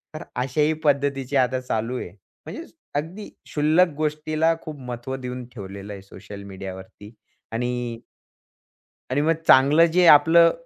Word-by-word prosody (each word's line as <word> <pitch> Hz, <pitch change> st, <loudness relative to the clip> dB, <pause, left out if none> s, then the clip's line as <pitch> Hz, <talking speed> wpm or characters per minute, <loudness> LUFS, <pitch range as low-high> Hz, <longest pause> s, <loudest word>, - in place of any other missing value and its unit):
तर 155 Hz, -, -6 dB
अशाही 140 Hz, +5 st, +1 dB
पद्धतीची 140 Hz, -2 st, 0 dB
आता 130 Hz, 0 st, +2 dB
चालू 120 Hz, 0 st, -2 dB
आहे. -, -, -6 dB, 0.4 s
म्हणजे, 330 Hz, -, -7 dB, 0.3 s
अगदी 170 Hz, +8 st, -4 dB, 0.2 s
शुल्लक 155 Hz, +5 st, +3 dB
गोष्टीला 155 Hz, +1 st, 0 dB
खूप 155 Hz, -2 st, -8 dB
महत्त्व 125 Hz, +1 st, -6 dB
देऊन 125 Hz, -1 st, -6 dB
ठेवलेलं 100 Hz, -1 st, -8 dB
आहे 100 Hz, -, -9 dB
सोशल 100 Hz, +1 st, -11 dB
मीडियावरती. 95 Hz, +2 st, -10 dB, 0.4 s
आणि 120 Hz, 0 st, -3 dB, 1.1 s
आणि 140 Hz, +3 st, +1 dB
मग 160 Hz, +2 st, +3 dB
चांगलं 145 Hz, +5 st, +6 dB
जे 180 Hz, -1 st, +5 dB
आपलं 165 Hz, +3 st, +7 dB
130 Hz, 130 wpm, -23 LUFS, 115-155 Hz, 1.1 s, आपलं